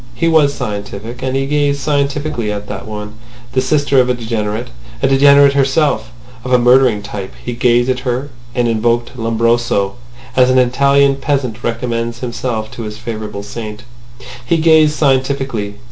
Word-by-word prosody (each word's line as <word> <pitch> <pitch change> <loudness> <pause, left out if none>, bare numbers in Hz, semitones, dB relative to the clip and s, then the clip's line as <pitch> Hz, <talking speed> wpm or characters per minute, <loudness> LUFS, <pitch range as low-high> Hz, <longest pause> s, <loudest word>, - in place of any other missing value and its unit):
He 145 +8 0
was 155 -3 +4
scientific, 110 -1 -6
and 130 0 -2
he 135 0 0
gazed 145 0 0
scientifically 140 -4 -1
at 105 0 -5
that 95 0 -7
woman, 105 0 -6 0.4
the 130 +1 +1
sister 140 0 +2
of 125 0 +3
a 125 - +1
degenerate, 110 -1 -3 0.3
a - - +5
degenerate 140 +1 +6
herself—of 130 - -1
a 125 - +6
murdering 125 -3 +4
type. 100 -1 -7
He 120 - -3
gazed 120 0 +2
at 130 -1 0
her, 130 +2 -3 0.2
and 120 -1 +1
invoked 115 +2 0
Lombroso, 115 -3 0 0.4
as 130 0 +4
an 130 - +3
Italian 140 +2 +3
peasant 135 -5 -2
recommends 115 0 -2
himself 120 -3 -3
to - - -8
his 105 -1 -6
favourite 110 -3 -6
saint. 105 +1 -7 0.6
He 165 +7 +1
gazed 155 -1 +4
scientifically. 135 -7 0
125 Hz, 155 wpm, -16 LUFS, 110-140 Hz, 0.6 s, degenerate